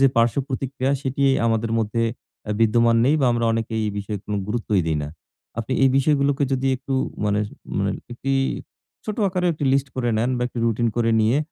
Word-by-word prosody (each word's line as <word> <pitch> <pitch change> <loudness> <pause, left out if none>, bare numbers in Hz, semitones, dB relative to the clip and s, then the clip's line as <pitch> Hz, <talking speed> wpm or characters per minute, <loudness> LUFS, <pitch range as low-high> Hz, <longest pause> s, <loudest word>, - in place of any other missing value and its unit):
যে 135 - +7
পার্শ্বপ্রতিক্রিয়া 130 +3 0
সেটি 135 0 -2 0.2
আমাদের 115 0 0
মধ্যে 115 +1 0 0.5
আ - - -1
বিদ্যমান 115 +1 +4
নেই 140 +4 +4
বা 135 - +3
আমরা 120 0 0
অনেকে 115 0 -2
এই 105 - 0
বিষয়ে 100 0 -4
কোন 105 - -3
গুরুত্বই 105 -2 0
দেই 80 -1 +1
না। 75 - -4 0.5
আপনি 115 +3 -3
এই - - +6
বিষয়গুলোকে 140 0 +2
যদি 135 0 0
একটু 135 +1 -4 0.3
মানে 105 0 +1 0.4
মানে - - +1 0.2
একটি 135 +3 -2 0.7
ছোট 215 -1 -4
আকারে 180 -1 -1
একটি 150 -2 -4
লিস্ট 135 0 +1
করে 125 -2 0
নেন 120 +3 +1
বা - - -1
একটা 125 - -7
রুটিন 115 +1 +1
করে 115 -1 +2
নিয়ে; 110 +6 +3
120 Hz, 190 wpm, -23 LUFS, 115-135 Hz, 0.7 s, যে